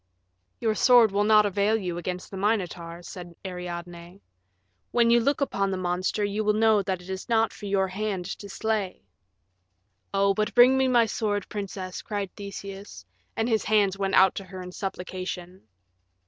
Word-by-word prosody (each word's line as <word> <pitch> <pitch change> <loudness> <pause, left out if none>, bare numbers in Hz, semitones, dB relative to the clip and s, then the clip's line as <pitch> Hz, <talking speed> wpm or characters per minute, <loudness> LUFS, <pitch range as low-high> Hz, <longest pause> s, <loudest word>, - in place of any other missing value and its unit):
"Your 220 -2 +1
sword 240 -1 +6
will 200 +1 +1
not 210 0 +5
avail 205 +2 +2
you 180 -4 -4
against 180 +1 -5
the - - -7
Minotaur," 180 -5 -2
said 175 -1 -9
Ariadne; 175 0 -7 0.7
"when 235 -1 +3
you 235 - +6
look 280 +5 0
upon 195 -8 0
the 190 - -2
monster 185 +3 -1
you 205 +2 -2
will 210 0 +2
know 220 -1 +4
that 190 -2 -3
it 180 - -13
is 190 +5 -6
not 225 -1 +2
for 205 - -8
your 195 -1 +1
hand 195 -1 -3
to 200 - -9
slay." 210 - -2 1.1
"Oh, 195 0 +3
but 215 +3 -2
bring 250 +2 +7
me 265 0 +3
my 240 -2 +4
sword, 205 -2 -2
princess," 190 -3 -5
cried 200 -3 -4
Theseus, 200 0 -8 0.3
and 225 - +1
his 220 -3 +1
hands 205 -3 +3
went 195 -1 -1
out 190 0 +6
to 195 - -6
her 185 0 -9
in 180 - -8
supplication. 185 - -6
200 Hz, 175 wpm, -26 LUFS, 185-215 Hz, 1.1 s, bring